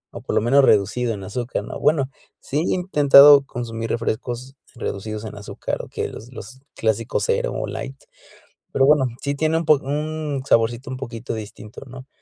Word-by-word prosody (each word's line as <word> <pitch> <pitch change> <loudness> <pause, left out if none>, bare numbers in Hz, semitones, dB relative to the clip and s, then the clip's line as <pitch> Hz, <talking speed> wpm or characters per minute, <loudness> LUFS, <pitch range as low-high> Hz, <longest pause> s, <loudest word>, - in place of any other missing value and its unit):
O - - -7
por - - -4
lo - - +3
menos 135 +5 +4
reducido 115 +2 +2
en 100 - -8
azúcar, 120 +5 -4
¿no? - - -7
Bueno, 145 -4 +2 0.3
sí 140 - -4
he 165 - 0
intentado 145 -5 +7
consumir 115 -2 -5
refrescos 120 +3 -3 0.2
reducidos 110 -1 -5
en 110 - -7
azúcar, 105 0 -5
o - - -11
que - - -3
los 120 +3 -11
los 130 +2 -11
clásicos 110 +1 -1
Zero 475 +1 0
o - - -3
Light, - - -6 0.7
pero 135 - +2
bueno, 145 -1 +4 0.2
sí 140 0 -1
tiene 155 +3 0
un 165 - -1
po 155 -1 +5
un 150 0 -3
saborcito 120 +3 +1
un 130 - -5
poquito 115 -3 -6
distinto, 105 -1 -9
¿no? 130 +1 -11
130 Hz, 180 wpm, -22 LUFS, 115-145 Hz, 0.7 s, intentado